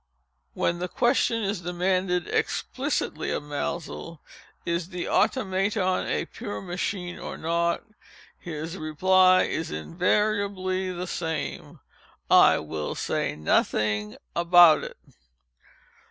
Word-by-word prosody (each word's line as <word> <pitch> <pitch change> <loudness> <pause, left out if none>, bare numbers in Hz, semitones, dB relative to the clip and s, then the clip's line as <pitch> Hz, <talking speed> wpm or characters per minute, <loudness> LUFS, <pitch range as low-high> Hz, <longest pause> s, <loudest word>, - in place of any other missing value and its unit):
When 175 0 0
the 180 - -2
question 240 0 +1
is 200 -2 -2
demanded 180 0 0
explicitly - - -2
of - - -2
Maelzel—"Is 165 +3 -5
the 180 -2 -4
Automaton 195 -4 +1
a - - -1
pure 105 0 -6
machine 180 - -4
or - - -6
not?" 170 +1 0 0.6
his 165 +2 -6
reply 185 +4 +4
is 160 +1 -3
invariably 185 - 0
the 180 0 -4
same—"I 160 -3 0
will 75 0 -4
say - - -2
nothing 105 +7 0 0.2
about 170 -2 +6
it." - - -8
175 Hz, 95 wpm, -26 LUFS, 160-185 Hz, 0.6 s, about